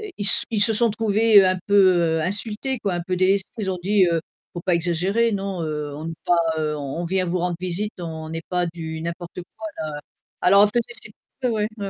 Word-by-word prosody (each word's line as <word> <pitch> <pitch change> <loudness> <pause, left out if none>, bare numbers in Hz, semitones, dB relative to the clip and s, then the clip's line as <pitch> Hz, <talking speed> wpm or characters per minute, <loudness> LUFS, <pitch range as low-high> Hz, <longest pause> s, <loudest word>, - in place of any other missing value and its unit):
Heu, 425 -2 -7
ils 205 - -2
s - - +5
ils 215 -3 +2
se 225 - +4
sont 235 +2 +3
trouvés 215 -1 +4
un 185 0 +2
peu 180 -5 +4
insultés, 210 - -2
quoi, 200 -4 -2
un 175 - -2
peu 185 0 -2
délestés, 190 +2 +2
ils 200 - -2
ont 180 - -3
dit: 200 0 +4 0.5
«Faut 175 - -4
pas 180 -2 +2
exagérer 185 +7 +1
non, 195 -3 -3
heu, 150 -1 -4
on 155 - -7
n'est 165 - -5
pas, 175 - +3 0.2
heu, 150 -1 -1
on 140 +2 -5
on 175 - -2
vient 185 +1 0
vous 180 +1 -1
rendre 175 -1 -1
visite, 185 +4 -3
on 160 -2 -6
n'est 165 0 -5
pas 180 -1 0
du 160 -1 -6
n'importe 170 +1 -6 0.2
quoi, 220 0 -6 0.5
là». - - -63
Alors 200 +3 +6
en - - +7
fait 235 +3 +1
c'est 215 -3 -9 0.3
c'est 250 - +2
ouais 215 -2 0
ouais, 200 - -4
185 Hz, 230 wpm, -23 LUFS, 170-210 Hz, 0.5 s, en